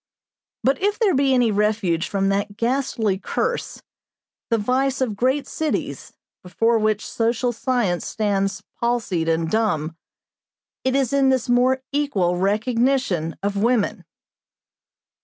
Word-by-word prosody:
But 270 +4 +1
if 410 +2 +1
there 420 -6 +2
be 275 -1 +2
any 245 -3 +3
refuge 205 -5 +1
from 195 -1 0
that 200 +1 -1
ghastly 230 -5 0
curse, 470 - -3 0.7
the 230 - +2
vice 260 +5 0
of 245 -6 -1
great 260 +6 +1
cities, 315 -1 -3 0.3
before 225 +5 +1
which 215 0 0
social 235 +2 0
science 230 -7 -1
stands 200 -2 -1 0.2
palsied 225 -9 0
and 165 0 +1
dumb, 165 -6 0 0.9
it 260 0 +1
is 270 -2 +1
in 275 -1 +4
this 260 -2 +1
more 255 +2 +2
equal 275 -12 +1
recognition 210 - 0
of 200 0 -1
women. 235 -1 +1
230 Hz, 125 wpm, -22 LUFS, 200-260 Hz, 0.9 s, in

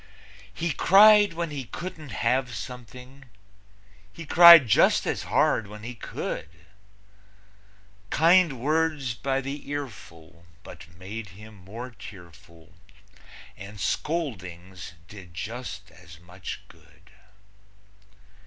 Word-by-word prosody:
He 170 0 -3
cried 205 0 +6
when 165 -1 -4
he 140 -3 -6
couldn't 155 +2 -8
have 125 +3 -1
something; 125 +4 -10 0.9
He 155 +10 -10
cried 170 -3 +9
just 105 - +3
as - - -3
hard 110 - +1
when 105 +1 -11
he 120 +2 -6
could; 80 -7 -6 1.6
Kind 165 -4 +3
words 150 -2 -1
by 135 +3 -2
the 140 +1 -7
earful 85 - -9 0.2
but 80 - -12
made 100 +3 -8
him 110 +1 -13
more 110 +6 -10
tearful, 85 -5 -15 0.8
And 100 +1 -11
scoldings 95 - -4
did 95 -4 -13
just 105 -1 -7
as 80 -4 -16
much 90 +2 -9
good. - - -22
115 Hz, 105 wpm, -25 LUFS, 95-145 Hz, 1.6 s, cried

